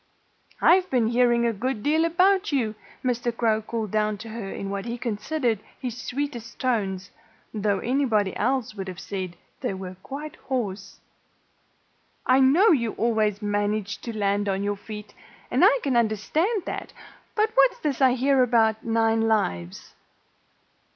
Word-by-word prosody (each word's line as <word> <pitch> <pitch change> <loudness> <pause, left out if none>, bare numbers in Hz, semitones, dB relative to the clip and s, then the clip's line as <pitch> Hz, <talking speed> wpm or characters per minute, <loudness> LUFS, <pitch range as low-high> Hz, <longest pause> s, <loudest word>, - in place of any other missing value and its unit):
"I've 370 +1 +5
been 240 -4 +2
hearing 240 0 +3
a 230 - +1
good 230 0 -3
deal 315 +3 +3
about; 380 +4 +3
you," 235 -7 0 0.3
Mr. 240 -1 -1
Crow 220 -2 +2
called 220 -2 -4
down 215 -1 +1
to - - -8
her 220 -3 -6
in 195 0 -5
what 200 +1 -3
he 235 0 -4
considered 240 0 -1 0.2
his 250 -4 -4
sweetest 245 -1 -5
tones, 195 -7 -1 0.4
though 205 -2 0
anybody 225 -5 +1
else 255 0 0
would 195 -2 -6
have 185 -2 -7
said 185 -3 -5 0.2
they 195 - -2
were 185 -1 -7
quite 295 +6 -7
hoarse. 205 -7 -4 1.3
"I 255 +1 +5
know 300 +11 +5
you 235 -8 +1
always 215 -3 0
manage 205 0 -1
to 230 -2 -6
land 200 0 +1
on 195 0 -1
your 205 0 0
feet 210 +1 -9 0.4
and - - +3
I - - +7
can 270 -3 0
understand 300 - +1
that. - - -5 0.4
But 435 0 +2
what's - - +4
this 295 - -2
I 260 -2 +6
hear 265 +1 +3
about 225 -3 +3
_nine 225 0 +2
lives? 90 - -1
230 Hz, 155 wpm, -25 LUFS, 205-265 Hz, 1.3 s, I